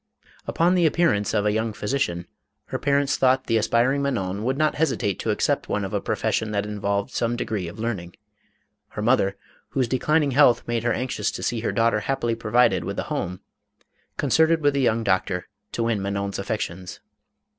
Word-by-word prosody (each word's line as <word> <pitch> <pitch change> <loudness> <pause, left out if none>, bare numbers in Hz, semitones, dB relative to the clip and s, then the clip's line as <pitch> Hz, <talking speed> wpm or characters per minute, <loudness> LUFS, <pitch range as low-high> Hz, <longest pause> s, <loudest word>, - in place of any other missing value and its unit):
Upon 170 +2 +2
the 175 -3 +4
appearance 155 - +1
of 105 - 0
a 105 - +3
young 110 +1 -1
physician, 105 -7 -2 0.4
her - - -3
parents 140 -1 +1
thought 130 0 +3
the 115 - +2
aspiring 120 +5 +2
Manon 100 -8 -2
would 130 +3 0
not 155 0 +2
hesitate 125 - 0
to - - -3
accept - - 0
one 105 -1 -1
of 95 - -6
a 100 - 0
profession, 110 - -1
that 100 0 0
involved 100 -1 -2
some 120 0 -1
de 120 - -3
gree 100 -5 -3
of 85 - -9
learning. 105 -6 -4 0.7
Her 105 - -6
mother, 100 -5 +2 0.3
whose 130 -3 0
declining 145 +4 +1
health 125 -3 +4
made 120 -1 0
her 120 +1 0
anxious 125 +3 -1
to - - -6
see 120 - -1
her 110 - -1
daughter 115 -1 +2
happily 120 0 -1
provided 115 +2 +2
with - - -5
a - - -1
home, 90 +1 -3 0.8
concerted 160 0 +3
with 145 -1 +3
the 140 - +1
young 115 -2 +2
doctor, 95 -2 0 0.3
to 115 - -1
win 115 -3 0
Manon's 100 0 -3
affections. 95 -4 -4
115 Hz, 190 wpm, -24 LUFS, 100-135 Hz, 0.8 s, the